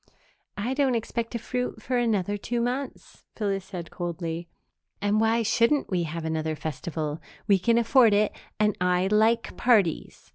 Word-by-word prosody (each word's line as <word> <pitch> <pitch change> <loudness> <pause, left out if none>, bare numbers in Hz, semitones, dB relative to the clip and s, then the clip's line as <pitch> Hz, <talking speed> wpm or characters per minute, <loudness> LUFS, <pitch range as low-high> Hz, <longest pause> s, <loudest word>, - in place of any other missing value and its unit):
"I 230 +6 -1
don't 265 -3 +2
expect 230 0 -2
to - - -1
fruit 250 +2 -3
for 255 - -3
another 210 -5 +1
two 235 +4 -3
months," 250 +3 -4
Phyllis 195 -3 -2
said 175 -4 -7
coldly, 170 -1 -4 0.5
"and 205 +2 +1
why 225 +1 +2
shouldn't 235 +5 +2
we 175 -2 +1
have 160 +1 -5
another 160 0 -1
festival? 155 0 -4 0.3
We 200 -2 +4
can 230 +5 +2
afford 235 -2 +5
it 210 +1 +3 0.3
and 210 -1 +2
I 180 0 +2
like 225 +2 +2
parties. 210 -10 +1
210 Hz, 155 wpm, -26 LUFS, 175-235 Hz, 0.5 s, afford